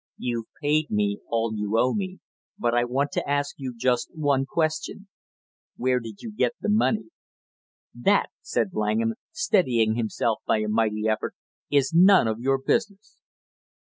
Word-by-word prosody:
"You've 115 -2 -3
paid 150 +1 +1
me 105 -1 0
all 115 -1 0
you 105 +1 -1
owe 125 +2 +3
me, 190 -2 -3 0.4
but 120 0 0
I 120 0 +3
want 135 +4 -1
to - - -3
ask 145 0 0
you 130 -3 -5
just 125 0 +1
one 140 -3 +1
question. 160 +6 -2 0.7
Where 125 0 +1
did 115 -3 -10
you 225 - -6
get 235 - +1
the - - -2
money?" 215 +5 +1 0.8
"That," - - +2
said - - -1
Langham, 110 +2 0 0.2
steadying 145 - +2
himself 115 0 -1
by - - +3
a 105 - -2
mighty 105 0 +1
effort, 110 -1 -1 0.3
"is 140 0 +2
none 185 - +6
of 110 0 -2
your 135 +2 +2
business!" 200 - -2
130 Hz, 155 wpm, -25 LUFS, 115-155 Hz, 0.8 s, none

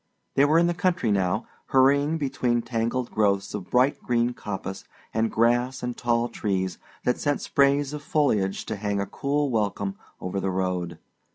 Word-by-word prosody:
They 140 - +5
were 155 +3 +4
in 170 - +5
the 175 - +1
country 180 - +1
now, 95 +3 +1 0.2
hurrying 140 +4 +4
between 130 -5 0
tangled 120 +1 -2
growths 100 -2 +1
of 100 -4 -6
bright 130 +3 +3
green 120 0 +1
coppice 95 -3 -5 0.3
and 115 +1 +1
grass 120 +3 +2
and 125 -1 -2
tall 120 0 +1
trees 95 -5 -2 0.2
that 125 - +1
sent 145 -1 0
sprays 140 +1 +2
of 150 - -5
foliage 140 - +1
to 110 - -4
hang 100 0 -1
a 100 - 0
cool 145 +3 -1
welcome 100 -3 -1 0.2
over 90 +2 -3
the 95 - -1
road. 90 -2 -2
120 Hz, 170 wpm, -25 LUFS, 100-140 Hz, 0.3 s, They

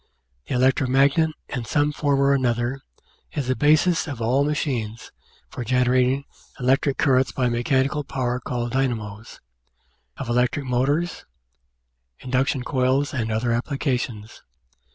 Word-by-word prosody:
The - - -2
electro 130 +1 +3
magnet, 140 +5 +3 0.2
in 125 -4 -3
some 145 +5 +1
form 145 -2 0
or 140 0 +4
another, 125 0 0 0.5
is 145 - -2
the 130 - +1
basis 155 +5 +3
of 140 -5 -5
all 125 +5 +2
machines 125 -7 -2 0.4
for 125 - -6
generating 125 +2 +2 0.3
electric 135 +2 +2
currents 130 -1 +3
by 125 -2 0
mechanical 130 +5 0
power 125 -3 -2
called 120 -1 -3
dynamos, 110 -5 -3 0.8
of - - -5
electric 125 +4 +1
motors, 140 +7 -1 0.9
induction 130 +1 0
coils, 130 +2 +1
and 115 -4 -2
other 115 +2 0
appliances. 125 -4 -3
130 Hz, 125 wpm, -23 LUFS, 120-140 Hz, 0.9 s, or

